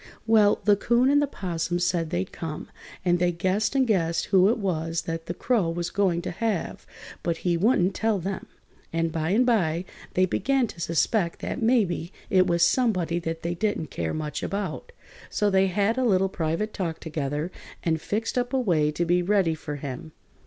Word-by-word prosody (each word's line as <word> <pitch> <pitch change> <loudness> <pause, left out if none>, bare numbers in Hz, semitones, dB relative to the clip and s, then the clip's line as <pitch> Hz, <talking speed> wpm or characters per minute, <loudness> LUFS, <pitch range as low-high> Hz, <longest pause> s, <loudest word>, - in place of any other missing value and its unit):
Well, 220 -2 +4
the 205 -1 +5
'Coon 240 +6 +3
and 290 0 +4
the 290 - +1
'Possum 175 -7 -2
said 175 -2 0
they'd 180 +2 -2
come, 160 -2 -6 0.4
and 175 -1 +3
they 175 0 +2
guessed 190 +7 0
and 265 -1 +4
guessed 170 -7 +1
who 190 0 +4
it 230 - +2
was 165 -5 -2
that 165 0 -5
the 175 - -2
Crow 225 -9 +1
was 170 +1 -3
going 180 -4 +1
to - - -3
have, 215 -1 -3 0.3
but 170 -1 -1
he 175 -1 +3
wouldn't 190 0 +3
tell 220 0 +1
them, 190 +2 -4 0.4
and 165 0 0
by 160 0 -1
and 225 +7 +3
by 180 -8 +1 0.3
they 185 - +4
began 265 +7 +1
to 190 - -10
suspect 170 +2 +1
that - - -4
maybe 215 -7 +1 0.2
it 185 -1 +5
was 170 -1 +4
somebody 180 -6 +1
that 165 -1 -4
they 170 +1 -1
didn't 175 -4 -2
care 80 -1 -2
much 150 -2 -4
about. 200 - -4 0.4
So 210 -1 +1
they 190 0 +4
had 205 +6 +1
a - - +2
little 195 -5 +3
private 170 +5 -2
talk 170 -5 -3
together 150 +1 -3 0.3
and 160 -2 0
fixed 225 +6 -1
up 245 +1 -3
a 265 - +3
way 165 -11 +2
to 170 - 0
be 175 +1 +3
ready 185 -3 +2
for 155 -2 -6
him. 140 +2 -7
180 Hz, 195 wpm, -26 LUFS, 165-210 Hz, 0.4 s, the